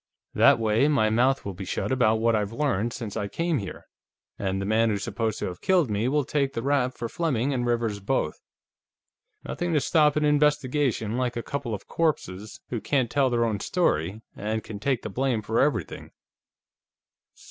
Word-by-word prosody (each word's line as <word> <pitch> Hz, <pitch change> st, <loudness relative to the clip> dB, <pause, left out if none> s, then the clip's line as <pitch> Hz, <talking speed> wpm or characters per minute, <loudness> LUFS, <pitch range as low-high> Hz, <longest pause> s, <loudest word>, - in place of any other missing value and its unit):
That -, -, +6 dB
way, 115 Hz, +4 st, +2 dB
my 130 Hz, -8 st, +2 dB
mouth 125 Hz, +4 st, +2 dB
will 100 Hz, -, -4 dB
be 95 Hz, -, -7 dB
shut 95 Hz, -, -3 dB
about 120 Hz, -4 st, +3 dB
what 115 Hz, +1 st, +2 dB
I've 105 Hz, -1 st, -1 dB
learned 115 Hz, -4 st, 0 dB
since 115 Hz, -4 st, -6 dB
I 105 Hz, -2 st, -2 dB
came 165 Hz, -, -1 dB
here, 100 Hz, -3 st, -7 dB, 0.5 s
and 95 Hz, -1 st, -1 dB
the 95 Hz, -, -3 dB
man 110 Hz, +2 st, +2 dB
who's 100 Hz, -2 st, -1 dB
supposed 110 Hz, 0 st, -2 dB
to -, -, -3 dB
have 90 Hz, -1 st, -6 dB
killed 175 Hz, -, +2 dB
me 105 Hz, +3 st, 0 dB
will 145 Hz, +1 st, +1 dB
take 140 Hz, -1 st, 0 dB
the 115 Hz, -, -3 dB
rap 135 Hz, -2 st, +1 dB
for 120 Hz, -, -4 dB
Fleming 140 Hz, -3 st, -1 dB
and 120 Hz, -2 st, -1 dB
Rivers 115 Hz, -3 st, 0 dB
both. 100 Hz, -6 st, -1 dB, 1.0 s
Nothing 175 Hz, -1 st, -3 dB
to 150 Hz, -, +4 dB
stop 150 Hz, +1 st, +3 dB
an 150 Hz, 0 st, +2 dB
investigation 145 Hz, -6 st, +1 dB
like 125 Hz, -2 st, -1 dB
a 120 Hz, -, -3 dB
couple 140 Hz, -6 st, -3 dB
of 100 Hz, -, -11 dB
corpses 110 Hz, -, -2 dB
who 120 Hz, -3 st, -2 dB
can't 130 Hz, 0 st, 0 dB
tell 140 Hz, -2 st, +3 dB
their 120 Hz, -1 st, +1 dB
own 110 Hz, -3 st, -1 dB
story 105 Hz, -, 0 dB
and 110 Hz, +1 st, -3 dB
can 105 Hz, -2 st, -7 dB
take 130 Hz, +2 st, 0 dB
the -, -, -4 dB
blame 125 Hz, -1 st, 0 dB
for 110 Hz, +2 st, 0 dB
everything." 125 Hz, -, -1 dB
120 Hz, 190 wpm, -26 LUFS, 110-140 Hz, 1.0 s, That